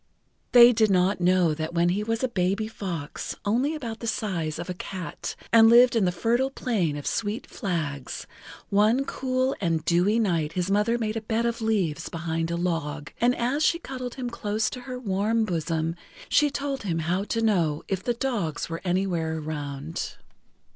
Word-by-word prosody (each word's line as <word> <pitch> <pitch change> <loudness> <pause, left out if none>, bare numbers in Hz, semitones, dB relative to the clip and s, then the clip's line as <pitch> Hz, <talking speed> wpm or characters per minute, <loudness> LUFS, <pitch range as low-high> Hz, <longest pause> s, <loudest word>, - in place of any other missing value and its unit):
They 240 0 +9
did 220 -1 +3
not 185 +1 +2
know 180 -2 +3
that 160 +2 -4
when 170 +1 +3
he 190 +4 0
was 225 +2 -2
a - - +3
baby 200 -1 0
fox, 175 -9 -5
only 250 +9 +1
about 235 -7 -5
the 230 - -5
size 175 -9 -2
of 175 - -5
a 180 - -3
cat, 185 0 -6 0.2
and 225 -1 +8
lived 240 +1 +7
in 220 -4 +3
the 180 - +2
Fertile 235 +8 +1
Plain 200 - -1
of 145 - -7
Sweet 215 +1 -2
Flags, 155 - -4 0.4
one 215 +7 +3
cool 260 0 -1
and 165 -3 0
dewy 180 +6 +3
night 170 -8 +1
his 180 +2 -1
mother 210 +4 +2
made 220 -1 -2
a - - -2
bed 225 +1 -1
of 235 -1 -1
leaves 200 -9 0
behind 165 0 -2
a 170 - -1
log, 160 -4 -2
and 245 +1 +4
as 255 +6 0
she 335 - +3
cuddled 255 -6 -6
him 250 -2 -4
close 215 -1 -1
to 250 - -7
her 250 - -4
warm 220 0 0
bosom 165 -2 -1 0.3
she 295 0 +4
told 280 -1 -3
him 175 -5 -2
how 175 +4 0
to 225 +1 -1
know 170 -9 +1
if 190 -1 -2
the 240 - 0
dogs 215 - -2
were 165 0 -4
anywhere 175 -3 0
around. 150 0 -5
200 Hz, 185 wpm, -26 LUFS, 165-235 Hz, 0.4 s, They